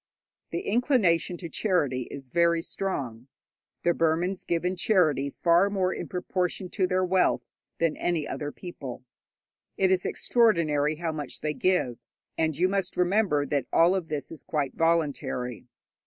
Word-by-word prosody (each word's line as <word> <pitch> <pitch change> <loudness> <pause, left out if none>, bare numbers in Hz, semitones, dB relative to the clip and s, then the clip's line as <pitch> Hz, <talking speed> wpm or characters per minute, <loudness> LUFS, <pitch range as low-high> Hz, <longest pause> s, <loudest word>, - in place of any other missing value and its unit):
The - - -3
inclination 205 - +2
to 170 - -6
charity 150 - 0
is 135 -2 -9
very 170 +2 +2
strong. 130 -13 -4 0.6
The 175 - +4
Burmans 170 +4 0
give 170 0 -1
in 180 +1 0
charity 170 -8 +2
far 170 +6 +3
more 190 -2 0
in - - -5
proportion 180 0 -2
to 185 -1 0
their 185 0 +1
wealth 185 0 +2 0.3
than 165 -2 +1
any 170 -4 -1
other 145 -1 -4
people. 135 -9 -8 0.7
It 190 -1 +3
is 185 -1 +2
extraordinary 155 -10 +2
how 165 +1 -2
much 150 -4 -6
they 150 -1 -1
give, 140 -5 0 0.4
and 160 -2 0
you 180 - +3
must 195 -1 -2
remember 180 -5 +2
that 140 -1 -1
all 170 +2 +5
of 185 -4 -2
this 150 -2 -4
is 165 - -6
quite 145 -4 -2
voluntary. 145 -7 -1
170 Hz, 155 wpm, -27 LUFS, 150-185 Hz, 0.7 s, all